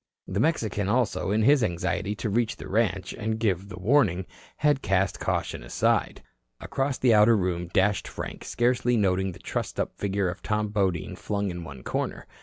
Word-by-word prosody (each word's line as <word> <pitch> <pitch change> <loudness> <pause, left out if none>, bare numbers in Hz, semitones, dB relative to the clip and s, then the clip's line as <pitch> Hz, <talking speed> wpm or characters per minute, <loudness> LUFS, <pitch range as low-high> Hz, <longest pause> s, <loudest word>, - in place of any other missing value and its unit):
The 95 +1 -2
Mexican 110 - 0
also, 120 -4 +1
in 105 +2 +2
his 140 +1 +5
anxiety 95 +2 -1
to 110 - -3
reach 115 +1 +1
the - - -9
ranch 100 -3 0
and 110 +1 -2
give 100 -4 0
the 90 - -8
warning, 95 - +2 0.3
had 145 -2 +2
cast 95 0 +1
caution - - -2
aside. - - 0 0.4
Across 135 0 -2
the 125 -3 +4
outer 110 +1 +6
room 90 -2 -1
dashed 95 +3 +1
Frank, - - -7
scarcely 120 0 +1
noting 95 -2 +1
the - - -12
trussed - - -4
up - - -2
figure 100 -1 0
of 90 +2 -4
Tom 105 -1 -1
Bodine 95 -6 -1
flung 100 -2 -2
in 85 0 -6
one 70 -5 -10
corner. - - -3
100 Hz, 180 wpm, -26 LUFS, 95-115 Hz, 0.4 s, outer